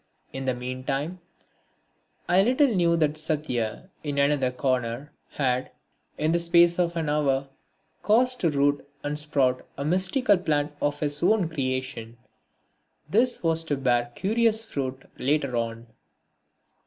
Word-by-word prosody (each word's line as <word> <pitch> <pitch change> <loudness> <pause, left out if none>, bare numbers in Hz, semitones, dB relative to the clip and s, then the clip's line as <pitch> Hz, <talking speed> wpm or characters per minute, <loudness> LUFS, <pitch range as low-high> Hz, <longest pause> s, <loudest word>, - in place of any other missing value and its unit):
In 135 0 -5
the 130 -1 0
meantime, 135 +7 -4 1.1
I 180 +2 +5
little 255 +7 +4
knew 170 -3 +2
that 155 -1 +1
Satya, 150 - -2
in 145 -2 -3
another 140 -2 +2
corner, 125 +1 -2 0.2
had, 130 -2 0 0.5
in 155 +1 +1
the 170 - +2
space 170 +1 +4
of 170 -1 +1
an 160 -2 -1
hour, 140 -2 +1 0.5
caused 250 +4 +3
to 170 - +2
root 145 -1 +1 0.2
and 150 +1 -1
sprout 135 -4 +1
a 140 - -3
mystical 190 - +2
plant 150 -4 0
of 145 0 -1
his 145 -1 -1
own 190 0 +3
creation. 130 -6 -4 0.9
This 240 +3 +2
was 165 -1 +2
to 145 -3 -1
bear 120 -2 +1
curious 225 +2 +1
fruit 130 -7 -4
later 140 -2 0
on. 115 0 -3
145 Hz, 135 wpm, -26 LUFS, 130-170 Hz, 1.1 s, I